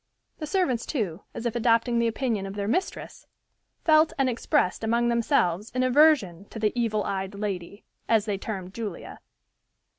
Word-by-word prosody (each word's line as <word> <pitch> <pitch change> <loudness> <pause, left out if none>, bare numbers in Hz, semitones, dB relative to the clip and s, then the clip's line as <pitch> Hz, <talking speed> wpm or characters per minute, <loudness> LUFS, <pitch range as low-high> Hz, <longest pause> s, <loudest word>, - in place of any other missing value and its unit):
The 305 - -4
servants, 295 - 0
too, 205 - -2
as 230 - -6
if 235 -1 -1
adopting 235 0 +2
the 235 - +2
opinion 225 -4 -1
of 195 - -7
their 200 -1 -3
mistress, 365 - -3 0.6
felt 310 0 +5
and 270 -2 +2
expressed 250 - 0
among 235 +2 +2
themselves 225 - +1
an 255 - +2
aversion 255 - +4
to 225 - -11
the 215 -1 0
"evil 225 -3 0
eyed 195 0 -3
lady," 200 -1 -5 0.3
as 220 -2 +3
they 205 -3 -2
termed 190 -3 -6
Julia. 210 -6 -6
225 Hz, 160 wpm, -26 LUFS, 200-255 Hz, 0.6 s, felt